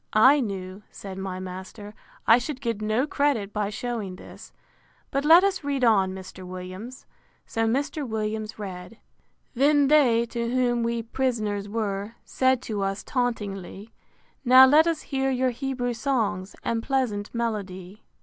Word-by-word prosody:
I 260 +7 +6
knew, 195 -4 -4
said 195 -1 -9
my 190 -1 -4
master, 190 +3 -8 0.3
I 230 +2 +6
should 265 +2 -5
get 230 -5 -3
no 215 +5 +1
credit 280 -9 0
by 210 -1 -1
shewing 215 -3 -4
this. - - -13 0.6
But 275 +1 0
let 335 +4 +8
us 385 -4 0
read 280 -2 -1
on, 200 -5 +4
Mr. 190 0 -9
Williams. 185 +7 -8 0.4
So 225 0 -1
Mr. 285 +5 -1
Williams 220 -1 -3
read: 190 -1 -7
III. 230 - -24 0.5
Then 285 +2 +4
they, 245 -6 +4
to 235 0 -3
whom 245 -1 +1
we 235 0 -1
pris'ners 220 -5 -2
were, 205 0 -3
Said 260 -1 +1
to 210 -3 -3
us, 195 +1 -2
tauntingly, 210 -4 -3 0.5
Now 255 +1 +9
let 300 +5 +5
us 330 -2 0
hear 270 -1 -1
your 260 -1 +1
Hebrew 245 -1 -3
songs, 225 -7 -1
And 230 -1 -1
pleasant 230 -6 -1
melody. 205 -4 -4
230 Hz, 150 wpm, -25 LUFS, 200-260 Hz, 0.6 s, Now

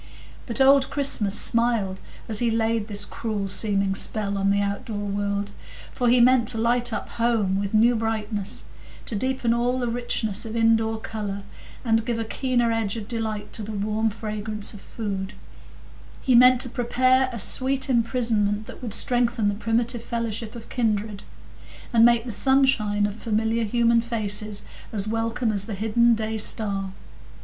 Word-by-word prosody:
But 230 - -1
old 270 0 +5
Christmas 225 -8 0
smiled 230 -5 +1 0.3
as 215 -2 -1
he 240 - +1
laid 225 -1 0
this 205 -2 -3
cruel 210 -3 -4
seeming 195 0 0
spell 200 +1 -2
on 195 0 +1
the 200 0 +2
outdoor 200 +2 -3
world, 200 0 -2 0.4
for 245 -2 +1
he 245 +1 +5
meant 245 -1 +5
to 230 - +2
light 240 +2 +1
up 215 - -4
home 220 -5 +1
with 200 +1 -2
new 230 +3 +5
brightness, 215 -2 -2 0.4
to 225 - -4
deepen 255 +1 0
all 245 +2 0
the 245 -1 -1
richness 230 -3 -2
of 225 -1 -6
indoor 225 -1 +2
colour, 205 -3 -5 0.4
and 225 -1 +2
give 235 0 -2
a 225 - -2
keener 240 0 0
edge 225 -1 -1
of 210 -2 -6
delight 220 -3 -4
to - - 0
the 215 +1 -6
warm 215 +2 0
fragrance 215 -1 -2
of 205 - -11
food; 195 -3 -5 0.9
he 260 - +1
meant 250 +1 +7
to 250 - -4
prepare 255 +2 +2
a 235 - -5
sweet 260 +5 +2
imprisonment 230 -4 +1
that - - -11
would 225 -4 -4
strengthen 240 -3 +1
the - - -1
primitive 230 +2 -1
fellowship 230 -1 -4
of 230 -1 -9
kindred, 215 -4 -1 0.7
and 230 -1 +5
make 235 0 +5
the 245 - -4
sunshine 225 -4 +3
of 205 - -2
familiar 225 +1 -1
human 235 +1 +3
faces 215 -3 -2 0.3
as 205 -2 -2
welcome 225 +1 -1
as 200 -2 -1
the 215 - -5
hidden 230 +3 +3
day 220 0 -3
star. 200 -3 -2
225 Hz, 165 wpm, -24 LUFS, 205-235 Hz, 0.9 s, meant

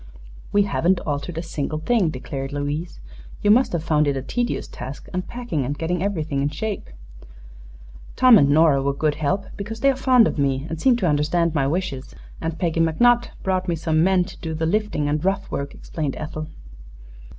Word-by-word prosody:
"We 205 0 +4
haven't 190 -2 +1
altered 145 +2 -4
a 165 - -2
single 155 -2 -3
thing," 190 +2 +1
declared 135 0 -5
Louise. 145 +4 -3 0.4
"You 205 - +5
must 250 +4 +4
have 170 -3 -2
found 150 -2 +2
it 140 -1 0
a 130 - -4
tedious 240 - -2
task, 130 +4 -8
unpacking 185 - -3
and 145 +3 -3
getting 170 +1 -1
everything 160 -8 -1
in 140 - +1
shape." 210 - -4 1.3
"Tom 250 -5 +7
and 140 - +4
Nora 150 -2 +4
were 140 0 0
good 150 +1 +1
help, 155 +6 -1
because 220 +3 -6
they 275 - +5
are - - -3
fond 255 -3 +5
of - - -3
me 135 0 0
and 165 -1 -5
seem 260 -2 +5
to 205 -7 0
understand 155 +2 +1
my 140 -4 +1
wishes; 145 -4 -3 0.3
and 165 0 -3
Peggy 165 -2 -1
McNutt 240 +10 +3 0.2
brought 185 -1 0
me 170 - +1
some 160 0 +1
men 185 0 +3
to 185 +1 -11
do 160 -1 -4
the 160 +1 -1
lifting 205 -4 0
and 150 +1 -1
rough 195 +1 -1
work," 140 0 -4
explained 150 -5 -4
Ethel. 155 0 -5
165 Hz, 195 wpm, -22 LUFS, 145-195 Hz, 1.3 s, Tom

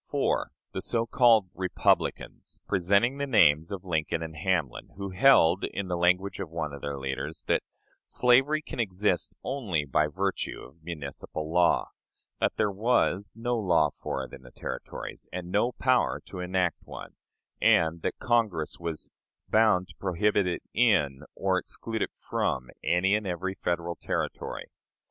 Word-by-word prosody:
4. - - 0 0.2
The - - -4
so 115 -1 0
called 115 -6 +4
"Republicans," 95 -1 -1
presenting 100 +8 +2
the 140 - -1
names 80 - +4
of 100 -1 -6
Lincoln 80 -1 -1
and 80 -1 -7
Hamlin, 80 -4 -1
who 100 -1 -5
held, 95 -6 +5
in 100 -2 -3
the 90 - 0
language 90 +2 +1
of 85 - -4
one 80 -3 -4
of 70 - -8
their 70 -1 -4
leaders, 65 0 -4
that - - +2 0.5
"slavery 135 +5 +3
can - - -8
exist 95 -3 0
only 105 - -1
by 75 +2 +2
virtue 95 +5 -2
of 75 +6 -15
municipal 80 0 -6
law"; 90 0 +3 0.5
that - - +1
there 105 - +1
was 100 -2 +1
"no 120 +2 -1
law 85 -7 +3
for - - -4
it - - -10
in - - -10
the 60 - -14
Territories, - - -7
and 90 0 -6
no 105 +5 +2
power 130 +1 +2
to 95 - -8
enact 90 -1 0
one"; - - -10 0.5
and 85 0 +4
that - - -2
Congress 110 -10 0
was 85 -2 -5 0.4
"bound 105 -5 +3
to - - -14
prohibit 100 +1 +1
it 90 - -2
in 85 - +3
or - - +1
exclude 115 -1 -5
it - - 0 0.2
from 65 -1 -1
any 95 +3 +2
and 105 -1 0
every 95 +1 -2
Federal 85 -2 -2
Territory." - - -3
90 Hz, 160 wpm, -28 LUFS, 80-105 Hz, 0.5 s, held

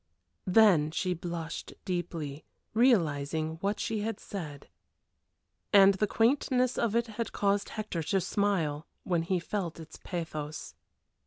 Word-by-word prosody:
Then 185 -6 +5
she 180 +3 -1
blushed 170 -2 -5
deeply, 165 -5 -3 0.3
realizing 160 - +2
what 200 +1 -1
she 220 -1 -1
had 225 +2 -3
said. 150 -8 -7 1.0
And 200 -1 +8
the 210 +2 0
quaintness 250 +2 +2
of 230 -2 +1
it 235 0 +2 0.3
caused 200 0 +1
Hector 215 -6 -4
to 190 +5 +1
smile 170 -6 0 0.2
while 175 -3 +1
he 180 +3 0
felt 175 -3 -4
its 160 -1 -11
pathos. 155 -4 -5
180 Hz, 125 wpm, -30 LUFS, 160-210 Hz, 1.0 s, And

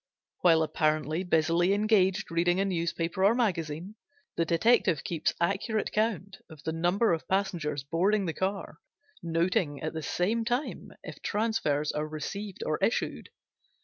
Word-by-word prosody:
While 165 -3 +5
apparently 155 +2 0
busily 175 +2 +2
engaged 200 -3 +2
reading 175 +2 +2
a 195 - +2
newspaper 170 0 -1
or 205 +4 +5
magazine, 175 -5 -1 0.4
the 165 - +1
detective 170 -2 +3
keeps 165 -3 -1
accurate 200 +5 0
count 200 -3 -1
of 155 -2 -13
the 160 - -2
number 175 +5 +2
of 165 - -3
passengers 175 -7 -1
boarding 190 +8 +1
the 165 - -2
car, 195 +3 -3 0.4
noting 165 -3 0
at 155 - -4
the 160 - -4
same 200 +10 0
time 245 +5 -3
if - - -9
transfers 205 -10 0
are 150 +1 -2
received 190 +6 -5
or 155 - -1
issued. 230 - -1
175 Hz, 145 wpm, -29 LUFS, 160-200 Hz, 0.4 s, While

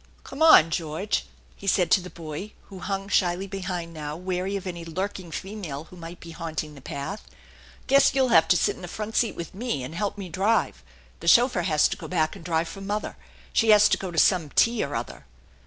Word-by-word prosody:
Come 275 - -9
on, 240 - +8
George/* 160 +5 -2 0.3
he 200 - -11
said 180 -3 +2
to 190 - +5
the 180 - -9
boy, 170 +5 -7 0.2
who 195 -2 -9
hung 195 +1 -3
shyly 185 -1 +1
behind 185 -3 -5
now, 150 -1 -5
wary 185 +2 -2
of 195 -1 -4
any 170 -2 -5
lurking 185 +2 -4
female 175 -5 -6
who 170 - -15
might 170 0 -9
be 165 - -10
haunting 160 -2 -5
the 140 - -13
path. 165 +11 -6 0.3
" - - -23
Guess 275 0 +4
you'll 265 -2 +3
have 160 -6 +5
to 180 - +4
sit - - +1
in - - -13
the 180 - -6
front 215 +4 -6
seat 235 - +2
with 170 - -7
me, 195 - -3
and 130 - -7
help 205 +4 -2
me 195 -2 -6
drive. 195 +6 0 0.4
The - - -8
chauffeur 240 -5 +5
has 155 -3 +3
to - - -4
go - - -8
back 160 -3 0
and - - -11
drive 165 -1 0
for 195 - -9
mother. 205 +2 -3 0.4
She 225 - +3
has 210 -1 +7
to - - +2
go 190 - -4
to 170 - -8
some 165 -3 +3
tea 230 -1 +3
or 140 - -4
other." 115 - -6
180 Hz, 225 wpm, -25 LUFS, 165-200 Hz, 0.4 s, on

